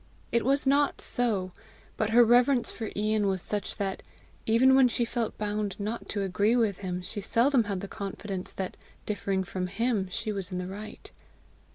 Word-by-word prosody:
It 235 Hz, -, +2 dB
was 275 Hz, +3 st, +2 dB
not 280 Hz, +1 st, +3 dB
so; 210 Hz, -7 st, 0 dB, 0.4 s
but 215 Hz, -, 0 dB
her 240 Hz, +2 st, +7 dB
reverence 245 Hz, +2 st, +4 dB
for 225 Hz, -2 st, -5 dB
Ian 210 Hz, 0 st, +1 dB
was 190 Hz, -1 st, 0 dB
such 205 Hz, -2 st, -3 dB
that, 195 Hz, -1 st, -3 dB, 0.5 s
even 245 Hz, +4 st, +5 dB
when 265 Hz, -1 st, +6 dB
she 240 Hz, 0 st, 0 dB
felt 235 Hz, -1 st, -3 dB
bound 210 Hz, -1 st, -2 dB
not 215 Hz, +3 st, -4 dB
to 200 Hz, -, -1 dB
agree 200 Hz, +4 st, +2 dB
with 220 Hz, -6 st, +1 dB
him, 180 Hz, -2 st, -4 dB
she 205 Hz, +2 st, -5 dB
seldom 235 Hz, +4 st, +3 dB
had 200 Hz, -3 st, -3 dB
the 200 Hz, -, -5 dB
confidence 195 Hz, -2 st, -5 dB
that, 190 Hz, -1 st, -5 dB, 0.3 s
differing 195 Hz, -2 st, -1 dB
from 185 Hz, -1 st, -3 dB
HIM, 210 Hz, -1 st, -1 dB
she 225 Hz, +2 st, -3 dB
was 195 Hz, -2 st, -4 dB
in 180 Hz, -, -3 dB
the 180 Hz, -, -3 dB
right. 205 Hz, +3 st, -8 dB
210 Hz, 185 wpm, -28 LUFS, 195-235 Hz, 0.5 s, her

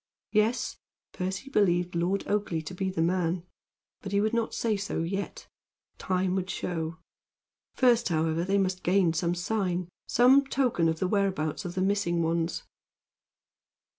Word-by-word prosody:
Yes. 215 Hz, +3 st, +1 dB, 0.4 s
Percy 190 Hz, +8 st, -4 dB
believed 180 Hz, -5 st, +2 dB
Lord 175 Hz, +3 st, 0 dB
Oakleigh 200 Hz, -6 st, -1 dB
to 185 Hz, -, -6 dB
be 190 Hz, +1 st, -2 dB
the 165 Hz, -3 st, 0 dB
man; 175 Hz, 0 st, 0 dB, 0.6 s
but 195 Hz, -, -6 dB
he 200 Hz, -, +2 dB
would 215 Hz, +2 st, +1 dB
not 230 Hz, -1 st, 0 dB
say 225 Hz, -2 st, +1 dB
so 200 Hz, -4 st, -2 dB
yet. 195 Hz, +4 st, -4 dB, 0.5 s
Time 185 Hz, 0 st, 0 dB
should 190 Hz, 0 st, -2 dB
show. 165 Hz, -4 st, -3 dB, 0.8 s
First, 240 Hz, -4 st, +4 dB
however, 160 Hz, 0 st, +1 dB
they 195 Hz, +2 st, +1 dB
must 185 Hz, -1 st, 0 dB
gain 180 Hz, -2 st, +3 dB
some 170 Hz, +2 st, 0 dB
sign 180 Hz, -2 st, -1 dB, 0.2 s
some 260 Hz, +4 st, +6 dB
token 245 Hz, -12 st, +1 dB
of 160 Hz, -, -1 dB
the 185 Hz, -, 0 dB
whereabouts 190 Hz, -4 st, 0 dB
of 175 Hz, +1 st, -5 dB
the 185 Hz, -, 0 dB
missing 185 Hz, -3 st, +1 dB
ones. 165 Hz, 0 st, -1 dB
185 Hz, 150 wpm, -28 LUFS, 170-200 Hz, 0.8 s, some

